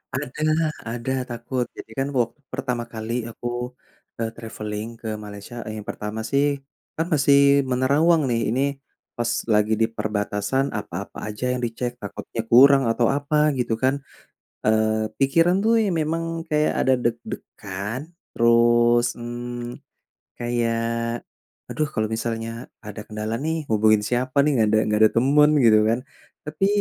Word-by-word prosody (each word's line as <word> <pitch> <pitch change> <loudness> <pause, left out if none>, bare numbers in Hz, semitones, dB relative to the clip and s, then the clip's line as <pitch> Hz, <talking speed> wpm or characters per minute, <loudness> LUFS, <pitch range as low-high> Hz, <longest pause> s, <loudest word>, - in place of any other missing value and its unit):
Ada 140 +2 -4 0.5
ada 120 +2 -3 0.2
takut. 120 +1 -2
Jadi - - -9
kan 135 - 0
waktu 120 +5 -1
pertama 125 -3 -2
kali 115 +1 -3
aku, 120 - -6 0.7
eee, 115 -1 -1
traveling 105 -1 -5
ke 115 - -6 0.2
Malaysia, 105 +3 -9
e - - -5
yang 105 - -11
pertama 105 +1 -5
sih, 140 +1 +3 0.6
kan 160 - +2
masih 140 -1 +5
menerawang 145 +6 +3
nih, 115 -1 +1
ini 130 - +1 0.6
pas 120 0 0 0.2
lagi 105 +1 +3
di 110 - +4
perbatasan 105 +4 -1
apa-apa 100 -1 -6
aja 105 +4 -5
yang 125 - -2
dicek, 120 +1 -3
takutnya 105 +2 -5
kurang 135 +3 +8
atau 120 0 +2
apa 145 +2 +2
gitu 120 -2 0
kan. 135 +2 +1 0.6
Eee, 110 0 +2
pikiran 165 +6 +3
tuh 225 +1 +3
ya 210 - +1
memang 165 +2 -1 0.3
kayak 150 0 +2
ada 130 - +4
deg-degan, 110 -1 -4 0.3
terus, 120 0 +4
mmm, 120 0 -6 0.6
kayak 115 0 -1 0.4
aduh 155 -1 -2
kalau 110 - +1
misalnya 115 +1 -4 0.2
ada 105 0 -7
kendala 110 +1 -3
nih 160 +1 -2
hubungin 110 0 +4
siapa 125 +3 -1
nih, 150 - +3
nggak 110 - +4
ada 110 +1 +3
nggak 105 0 +1
ada 110 - +7
teman 145 +5 +5
gitu 110 -2 +7
kan. 115 +2 +2 0.5
Tapi 155 +6 0
120 Hz, 145 wpm, -23 LUFS, 110-135 Hz, 0.7 s, kurang